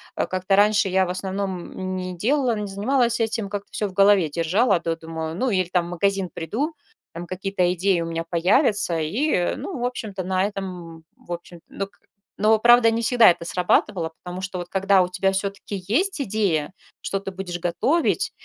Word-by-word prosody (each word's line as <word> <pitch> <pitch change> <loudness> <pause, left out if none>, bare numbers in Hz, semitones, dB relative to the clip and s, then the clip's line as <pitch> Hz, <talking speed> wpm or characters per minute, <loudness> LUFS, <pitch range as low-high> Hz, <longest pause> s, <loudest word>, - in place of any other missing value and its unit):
э, - - -1
как-то 185 +1 0
раньше 205 0 +4
я 190 0 +2
в - - -6
основном 185 0 -4
не 185 -1 -4
делала, 245 - +1
не 210 -1 -4
занималась 235 +4 +1
этим, 225 -2 -1
как-то 200 0 -5
всё 210 - -2
в 190 - -10
голове 195 -3 +4
держала, 175 - +2
до 165 -1 -2
думаю, 160 0 -6
ну, 260 +7 0
иль 185 -4 0
там 175 -2 +1
в - - -8
магазин 195 +1 0
приду, 240 - -3 0.4
там 170 +1 -7
какие-то 185 0 -1
идеи 185 0 +1
у - - -2
меня 165 0 -3
появятся 180 - +2
и, 180 - 0
ну, 370 - -6
в - - -3
общем-то 210 -6 -4
на 185 +1 0
этом, 180 -5 -7
в - - -15
общем, 175 0 -9
док 195 0 -6 0.4
Но, 215 +2 +4
правда, 240 0 +6
не 230 - -1
всегда 235 -3 +6
это 170 0 -5
срабатывало, 180 0 +1
потому 180 +1 -6
что, 185 -1 -4
вот 175 0 -7
когда 195 0 +3
у 180 - +1
тебя 195 +2 +1
всё-таки 200 0 -3
есть 370 - +1
идея, 190 - 0 0.3
что 195 - -2
ты 195 - -6
будешь 185 -2 -5
готовить 230 - +1
190 Hz, 190 wpm, -23 LUFS, 175-210 Hz, 0.4 s, правда